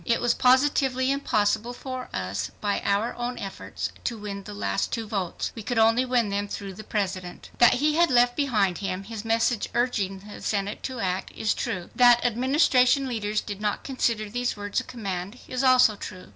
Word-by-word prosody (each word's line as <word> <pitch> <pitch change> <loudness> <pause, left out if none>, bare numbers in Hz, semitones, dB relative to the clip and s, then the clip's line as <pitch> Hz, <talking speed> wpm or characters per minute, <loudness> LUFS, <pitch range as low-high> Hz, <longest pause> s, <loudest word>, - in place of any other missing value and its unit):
It 230 - +1
was 240 -1 +2
positively 260 0 +3
impossible 220 -4 0
for 255 0 -6
us, 100 +3 -3
by 205 -1 -1
our 200 +4 +1
own 245 0 -3
efforts, 195 -3 -5
to 235 - -2
win 200 -2 -6
the - - -7
last 100 -1 -1
2 230 -2 -2
votes. 195 -5 -3
We 225 - -7
could 235 +3 -3
only 225 +3 +4
win 245 -4 +1
them 200 +1 -1
through 200 -1 -6
the 215 +4 -10
President. 185 -4 -4
That 240 - +7
he 300 +4 +2
had 340 -1 +5
left 245 -1 +4
behind 210 - +1
him 195 -1 -3
his 215 0 -7
message 225 0 +1
urging 205 -6 0
the 210 - -10
Senate 200 0 -2
to 255 -2 -6
act, 185 -1 -2
is 215 - 0
true. 185 -7 -4
That 245 -1 +6
Administration 260 +2 +3
leaders 215 -3 -1
did 205 0 -7
not 210 -1 -1
consider 230 -5 -1
these 245 +2 -2
words 205 0 -2
a - - -4
command, 195 -2 -5
is 255 +1 -2
also 255 -4 +6
true. 185 -2 -9
225 Hz, 190 wpm, -26 LUFS, 200-250 Hz, -, That